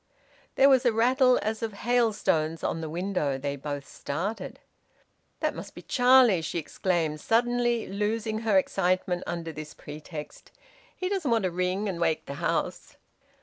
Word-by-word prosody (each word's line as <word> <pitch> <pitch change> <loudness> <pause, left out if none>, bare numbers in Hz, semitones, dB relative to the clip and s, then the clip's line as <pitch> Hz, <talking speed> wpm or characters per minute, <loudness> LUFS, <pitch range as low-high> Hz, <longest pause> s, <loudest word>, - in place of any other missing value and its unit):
There 270 - +6
was 265 -2 +5
a 245 - +4
rattle 250 +3 +4
as 220 +1 -2
of 225 -2 -3
hailstones 205 -9 +1
on 165 - -1
the 160 - -4
window. 170 -5 -1
They 140 +1 -3
both 145 0 -5
started. 185 +10 -4 0.8
"That - - +1
must - - -9
be - - -10
Charlie!" 245 -7 +5
she 160 +2 -3
exclaimed, 165 -2 -1
suddenly 240 0 +1
loosing 215 +2 -2
her 220 -3 +2
excitement 185 -1 +1
under 170 -1 -4
this 155 -1 -9
pretext. 150 0 -9 0.4
"He 365 - -3
doesn't 375 -7 -1
want 230 -3 +2
to 185 - 0
ring 185 +4 -1
and 180 -4 -3
wake 165 -2 +1
the - - -6
house." - - -2
195 Hz, 155 wpm, -27 LUFS, 160-230 Hz, 0.8 s, There